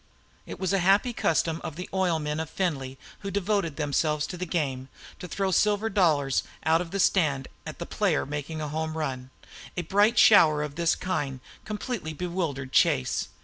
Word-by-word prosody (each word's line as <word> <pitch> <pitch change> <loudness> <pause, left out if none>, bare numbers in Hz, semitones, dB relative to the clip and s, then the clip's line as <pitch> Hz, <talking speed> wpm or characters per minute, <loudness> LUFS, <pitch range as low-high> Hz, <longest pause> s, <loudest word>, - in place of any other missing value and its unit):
It - - -8
was 190 0 -1
a 195 - +3
happy 195 +7 +3
custom 165 -4 0
of 150 - -5
the 180 +2 -6
oil 185 -3 +1
men 150 0 -3
of 160 -1 -4
Findlay, 135 -9 -2 0.2
who 200 - -5
devoted 195 -5 -1
themselves 150 0 0
to 180 - -6
the 180 +1 -5
game, 135 -6 -2 0.3
to 180 - -7
throw 190 +3 -1
silver 210 +4 +2
dollars 150 -9 +2 0.2
out 160 +1 +4
of 175 - -5
the 200 - -3
stand 150 -9 +2 0.2
at - - -7
the - - -5
player - - 0
making 150 +2 -5
a 150 - -3
home 160 +1 -3
run. 130 -4 -3 0.5
A 175 - -1
bright 205 +7 +3
shower 155 -8 +6
of 150 -1 -5
this 170 +2 +1
kind 145 -8 -3 0.3
completely 210 -6 -4
bewildered 160 -6 -3
Chase. 65 - +2
165 Hz, 185 wpm, -27 LUFS, 150-190 Hz, 0.5 s, shower